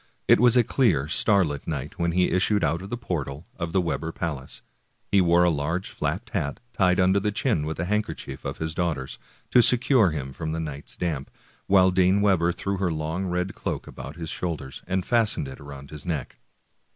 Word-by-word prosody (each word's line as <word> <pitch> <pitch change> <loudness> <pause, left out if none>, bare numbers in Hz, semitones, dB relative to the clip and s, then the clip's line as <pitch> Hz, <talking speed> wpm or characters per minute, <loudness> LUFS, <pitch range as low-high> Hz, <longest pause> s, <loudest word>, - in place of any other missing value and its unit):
It - - +6
was 125 +1 +5
a 120 - +6
clear, 100 - +2
starlight 85 -4 +1
night 75 -1 -4
when 85 -1 +1
he 90 +1 +2
issued 100 +3 +2
out 85 +2 +1
of 95 - -8
the 120 - -3
portal 80 - -4
of 85 -1 -4
the 95 - +2
Webber 80 -2 -2
palace. 75 -6 -5 0.5
He 100 - +5
wore 85 0 +4
a 90 - +4
large 80 +5 -2
fiapped 90 - -3
hat, 80 -10 -2
tied 90 -1 +3
under 95 +2 +4
the 105 +1 -1
chin 100 - 0
with 80 - -4
a 85 - 0
handkerchief 105 -9 -3
of - - -4
his 80 0 -3
daughter's, 80 -7 -2 0.3
to 125 - +7
secure 125 -3 +4
him 70 -4 -5
from 80 +1 -4
the 80 - -2
night 75 -3 -6
damp, 75 -6 -2 0.4
while 95 -1 +5
Dame 95 +2 +3
Webber 95 -4 +3
threw 100 +3 -3
her 90 -2 0
long 80 +4 -2
red 90 +1 -1
cloak - - -4
about 70 +3 -9
his 80 -2 -5
shoul 85 -3 -2
ders, 65 -2 -9
and 95 0 -1
fastened 115 - +2
it 65 - -9
round 70 -1 -10
his 75 -1 -6
neck. 80 -6 -4
85 Hz, 205 wpm, -25 LUFS, 75-95 Hz, 0.5 s, to